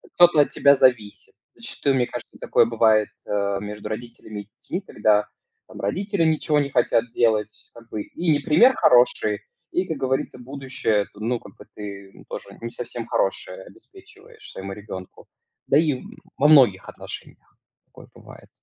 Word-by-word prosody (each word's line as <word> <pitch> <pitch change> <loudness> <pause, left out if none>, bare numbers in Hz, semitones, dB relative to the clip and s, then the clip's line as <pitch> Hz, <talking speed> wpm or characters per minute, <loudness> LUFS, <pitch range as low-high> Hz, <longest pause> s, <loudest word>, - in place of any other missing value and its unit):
кто-то 175 -3 +6
от 145 - +1
тебя 140 0 +5
зависит. 120 -6 +1 0.2
Зачастую, 140 -1 -2
мне 125 -2 +1
кажется, 120 -1 -9
такое - - +3
бывает, 110 -2 +3 0.2
э, 100 -1 -1
между 105 0 -7
родителями 110 -2 -7
и 100 - -17
детьми, 180 +7 -5
когда 105 - +1 0.4
там - - -12
родители 200 -2 -1
ничего 155 -1 +2
не 140 - -1
хотят 115 +1 +1
делать 110 -2 0
как 115 -1 -15
бы. 110 - -4
И 170 -1 -2
не 145 - +3
пример 205 - +5
хороший, 120 - +3 0.3
и, 180 - 0
как 160 - -3
говорится, 130 -1 -2
будущее 125 -5 -2
ты, - - -15
ну, 115 +3 -1
как - - -15
бы - - -14
ты 100 -2 -9
тоже - - -6 0.2
не 115 0 -5
совсем - - -6
хорошее - - -2
обеспечиваешь 435 0 -17
своему 95 0 -7
ребенку. 95 -3 -10 0.4
Да 140 - +4
и 150 -5 +1 0.4
во 145 - +4
многих 125 -12 +5
отношениях - - -10 0.3
такое - - -16
бывает. - - -15
120 Hz, 160 wpm, -23 LUFS, 105-150 Hz, 0.4 s, кто-то